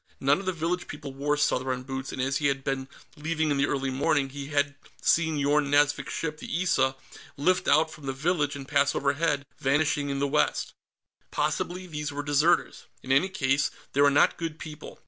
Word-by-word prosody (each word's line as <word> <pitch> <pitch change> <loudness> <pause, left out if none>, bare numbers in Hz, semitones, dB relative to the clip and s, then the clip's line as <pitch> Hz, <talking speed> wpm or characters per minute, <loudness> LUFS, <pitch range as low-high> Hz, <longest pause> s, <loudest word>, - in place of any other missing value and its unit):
None 140 +5 +3
of 195 - -8
the - - +3
village 175 +1 -2
people 145 -2 -7
wore 145 +2 0
Southron 130 -3 0
boots, 135 0 -5
and - - -7
as 135 +2 +1
he 145 - +1
had 135 -1 -1
been 135 -1 -2 0.3
leaving 160 0 -1
in 140 - +1
the 140 +1 +2
early 135 -1 -1
morning, 135 +1 +1
he 140 +1 -7
had 145 -1 +1 0.3
seen 160 -2 +2
Yorn 145 0 +2
Nazvik's 145 -1 +2
ship, 155 -1 -3
the 170 +4 -2
Issa, 135 -7 +2 0.4
lift 185 +6 +2
out 160 +2 +4
from 145 -3 -10
the - - 0
village 145 +1 0
and 135 -1 -8
pass 140 0 +2
overhead, 140 +1 0
vanishing 145 +1 +1
in 140 - -1
the 140 +1 +1
west. 150 +2 0 0.6
Possibly 180 +1 -2
these 150 -3 -4
were 145 0 -4
deserters. 150 +4 +2 0.2
In 130 - -4
any 140 +8 +4
case, 140 -6 +1 0.2
they 140 - +3
were 145 - +7
not 140 - +3
good 165 -2 -4
people. 155 -1 -9
145 Hz, 200 wpm, -27 LUFS, 140-155 Hz, 0.6 s, were